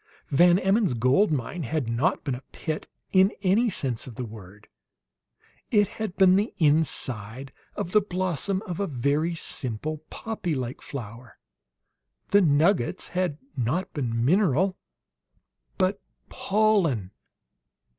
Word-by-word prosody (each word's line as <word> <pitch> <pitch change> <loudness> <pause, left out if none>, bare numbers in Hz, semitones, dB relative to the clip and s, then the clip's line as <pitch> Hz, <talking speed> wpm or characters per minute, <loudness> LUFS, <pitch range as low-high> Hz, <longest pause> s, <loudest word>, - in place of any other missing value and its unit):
Van 175 +5 +5
Emmon's 195 - +2
"gold 130 - +3
mine" 150 +5 -2
had 145 -1 -2
not 125 +11 0
been 140 - -2
a 125 - -5
pit 155 -2 -4 0.2
in 190 +1 +5
any 210 +6 +3
sense 130 - -2
of 120 - -9
the 125 - -4
word; 105 -2 -12 1.0
it 205 -3 +4
had 215 -5 -5
been 190 -1 +6
the 210 +3 -1
inside 135 - 0 0.2
of 170 - -4
the 210 - +5
blossom 185 0 -1
of 175 -1 -5
a 200 - 0
very 145 +5 0
simple, 150 0 -4
poppy 205 -8 -3
like 125 -1 -4
flower. 115 -2 -8 0.9
The 205 - +5
"nuggets" 160 -2 +2
had 180 -4 -1 0.2
been 125 - -2
not 165 +13 -2
mineral, 150 - +2 1.0
but 190 +1 +1 0.3
pollen. 190 - +1
160 Hz, 125 wpm, -26 LUFS, 125-190 Hz, 1.0 s, been